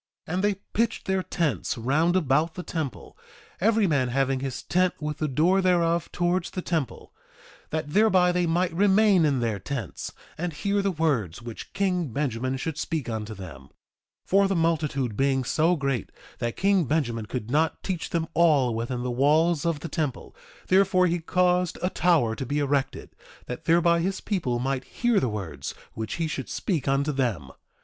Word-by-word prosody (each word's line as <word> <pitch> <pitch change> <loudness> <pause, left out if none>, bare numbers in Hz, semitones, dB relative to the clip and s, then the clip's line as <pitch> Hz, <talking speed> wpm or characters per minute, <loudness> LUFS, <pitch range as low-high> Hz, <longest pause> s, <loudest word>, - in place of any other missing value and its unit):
2:6 160 - -4
And 185 +2 0
they 205 0 +3 0.2
pitched 230 +1 0
their 190 0 +1
tents 150 - -1
round 150 +9 +1
about 160 -1 +2
the 180 - -5
temple, 155 -8 -5 0.4
every 220 +2 +3
man 140 -7 +2
having 135 +1 0
his 135 -1 -4
tent 180 0 +1
with 150 -1 -4
the 155 - 0
door 165 +8 +3
thereof 170 -2 +2
towards 175 +1 0
the 185 - -4
temple, 160 -7 -3 0.6
that 155 -1 -3
thereby 190 -4 +4
they 180 -1 +1
might 170 +1 +1
remain 200 -1 +4
in 140 -4 +1
their 110 -4 -1
tents 125 -7 -5 0.3
and 175 -1 -2
hear 200 +7 0
the 200 - +1
words 135 - -1
which 115 -2 -8
king 185 -4 0
Benjamin 130 0 -2
should 155 +3 -4
speak 155 -4 -2
unto 110 -1 -4
them; 80 -9 -10
2:7 - - -22 0.6
For 195 +1 +4
the 195 - 0
multitude 150 -8 0
being 135 +2 +1
so 160 +7 +2
great 135 - -2 0.3
that 120 -1 -3
king 195 -3 +3
Benjamin 120 -7 -1
could 120 -1 -5
not 155 +3 +1
teach 180 -4 -3
them 165 -2 -1
all 145 -8 +4
within 120 +2 -3
the 125 - -2
walls 155 +6 +2
of 160 -4 -1
the - - -4
temple, 150 -6 -3 0.3
therefore 185 -1 +4
he 175 0 +1
caused 180 +1 +1
a 180 - +1
tower 155 -11 +2
to 135 - -4
be 145 +3 -1
erected, 140 -2 -1 0.3
that 125 - -7
thereby 170 0 +4
his 190 +3 -1
people 160 - -1
might 130 +1 -1
hear 240 -3 +1
the 130 - 0
words 80 -10 -5 0.2
which 110 -1 -4
he 165 - -1
should 140 -3 -5
speak 170 -9 -2
unto 140 +2 +1
them. 115 - -2
155 Hz, 180 wpm, -26 LUFS, 130-180 Hz, 0.6 s, thereby